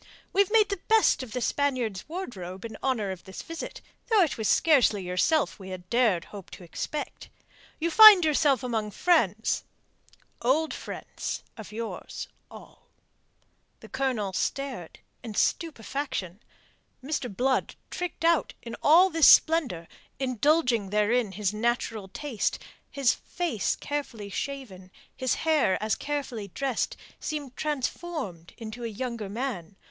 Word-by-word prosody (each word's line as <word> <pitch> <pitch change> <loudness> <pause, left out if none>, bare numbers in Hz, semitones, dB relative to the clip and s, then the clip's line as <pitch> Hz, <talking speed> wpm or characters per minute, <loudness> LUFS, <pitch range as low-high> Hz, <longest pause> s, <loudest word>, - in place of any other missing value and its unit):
"We've 400 -1 +3
made 430 -1 +4
the 400 -2 -2
best 445 -8 +4
of 255 -4 -8
the 250 - -3
Spaniards' 250 -9 -1
wardrobe 195 - -6
in 225 -1 -7
honour 230 -7 0
of 185 -2 -8
this 190 - -8
visit, 330 0 -7 0.3
though 440 -5 +5
it 320 - -1
was 220 -3 -2
scarcely 255 - +4
yourself 180 - +1
we 190 -1 -9
had 180 -1 -8
dared 225 -8 +2
hope 200 -3 -11
to - - -13
expect. 290 - -5 0.5
You 335 +1 0
find 420 -3 +10
yourself 290 -4 +3
among 225 -4 -1
friends 220 - +1 0.8
old 300 +6 +2
friends - - -6
of 220 -2 -10
yours, 225 +1 -6 0.2
all." - - -15 0.9
The - - -12
Colonel 255 -8 -1
stared 260 -7 -3 0.2
in 225 -4 -7
stupefaction. 250 - -2 0.6
Mr. 270 -4 -3
Blood 260 +1 +1 0.2
tricked 355 -2 -4
out 335 -2 +2
in 230 -1 -6
all 355 +5 +6
this 325 -1 +5
splendour 260 - +5 0.3
indulging 255 -4 +2
therein 210 +1 +1
his 205 0 -1
natural 225 -2 -1
taste 255 +3 -2 0.3
his 275 -3 +2
face 330 - -2
carefully 250 -8 -5
shaven, 210 -9 -6 0.3
his 260 -2 0
hair 305 -11 +3
as 215 0 0
carefully 275 -8 -3
dressed, 260 +5 -2 0.2
seemed 290 -4 -5
transformed 290 - -4
into 225 +1 -7
a - - -1
younger 230 -1 -4
man. 205 -6 -4
245 Hz, 135 wpm, -27 LUFS, 210-300 Hz, 0.9 s, find